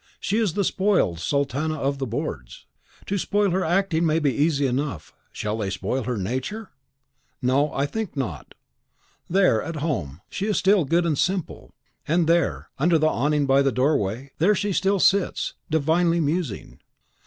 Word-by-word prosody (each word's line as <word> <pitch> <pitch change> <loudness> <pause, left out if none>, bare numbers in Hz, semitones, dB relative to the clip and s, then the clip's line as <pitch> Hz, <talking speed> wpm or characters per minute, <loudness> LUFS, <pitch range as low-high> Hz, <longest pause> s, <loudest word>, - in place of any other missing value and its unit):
She 210 +3 0
is 210 -8 +1
the 200 - 0
spoiled 185 - +1
sultana 140 - -1
of 140 -1 -2
the 135 - -2
boards. 115 - -5 0.4
To 200 0 -1
spoil 205 +1 +1
her 185 +2 +1
acting 175 -1 +1
may 160 -1 +2
be 145 -5 +1
easy 145 -1 +1
enough, 130 - -3 0.2
shall 105 +1 -3
they 100 -3 -2
spoil 110 +6 -2
her 125 -2 -2
nature? 130 - -4 0.7
No, 140 +3 +1
I 140 - 0
think 205 +1 -5
not. 95 - -5 0.7
There, 180 - +3
at 165 - -5
home, 110 - -3
she 200 - -4
is 210 - +1
still 195 -4 +3
good 170 +5 +2
and 155 -4 0
simple; 185 -3 -2 0.3
and 170 +2 +2
there, 165 -2 +1
under 165 +3 +4
the 155 0 +3
awning 145 +2 +1
by 135 0 +4
the 135 -1 +2
doorway, 130 -1 0
there 200 +6 +4
she 205 0 -1
still 195 +2 +2
sits, 195 +1 +2 0.2
divinely 165 +2 +2
musing. 155 - -2
155 Hz, 165 wpm, -24 LUFS, 130-180 Hz, 0.7 s, under